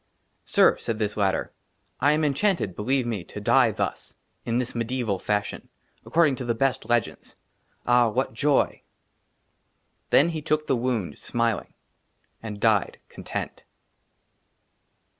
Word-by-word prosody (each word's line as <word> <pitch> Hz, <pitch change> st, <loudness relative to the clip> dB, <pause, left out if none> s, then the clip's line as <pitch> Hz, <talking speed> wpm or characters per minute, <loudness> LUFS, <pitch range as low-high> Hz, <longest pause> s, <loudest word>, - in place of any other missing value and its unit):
" -, -, -46 dB
SIR," -, -, +4 dB
SAID 115 Hz, -, -3 dB
THIS 105 Hz, -1 st, -1 dB
LATTER, 100 Hz, -2 st, 0 dB, 0.2 s
" -, -, -45 dB
I 145 Hz, +3 st, +4 dB
AM 155 Hz, +1 st, +1 dB
ENCHANTED, 150 Hz, -, 0 dB
BELIEVE 130 Hz, +4 st, 0 dB
ME, 110 Hz, -6 st, -3 dB
"TO 105 Hz, -, -9 dB
DIE, 120 Hz, +3 st, +4 dB
THUS, 110 Hz, -, -4 dB
" -, -, -45 dB
IN 115 Hz, 0 st, +1 dB
THIS 125 Hz, -1 st, -2 dB
MEDIEVAL 115 Hz, -4 st, -2 dB
FASHION, 105 Hz, +1 st, -2 dB, 0.2 s
" -, -, -39 dB
ACCORDING 155 Hz, -5 st, +3 dB
TO 130 Hz, -, -5 dB
THE 120 Hz, -1 st, -1 dB
BEST 135 Hz, +1 st, -1 dB
LEGENDS; 120 Hz, -2 st, -1 dB, 0.3 s
" -, -, -42 dB
AH, 120 Hz, -1 st, +4 dB
WHAT 125 Hz, +1 st, -1 dB
JOY! 145 Hz, +5 st, +3 dB, 0.7 s
" -, -, -46 dB
^ -, -, -47 dB
THEN 170 Hz, +4 st, +4 dB
TOOK 155 Hz, +1 st, +1 dB
HE -, -, -23 dB
THE 135 Hz, -, +1 dB
WOUND, 120 Hz, -6 st, -1 dB
SMILING^ 115 Hz, -4 st, -1 dB, 0.7 s
AND 105 Hz, -2 st, -7 dB
DIED, 105 Hz, -3 st, +2 dB
CONTENT. -, -, -6 dB
120 Hz, 160 wpm, -25 LUFS, 110-135 Hz, 0.7 s, SIR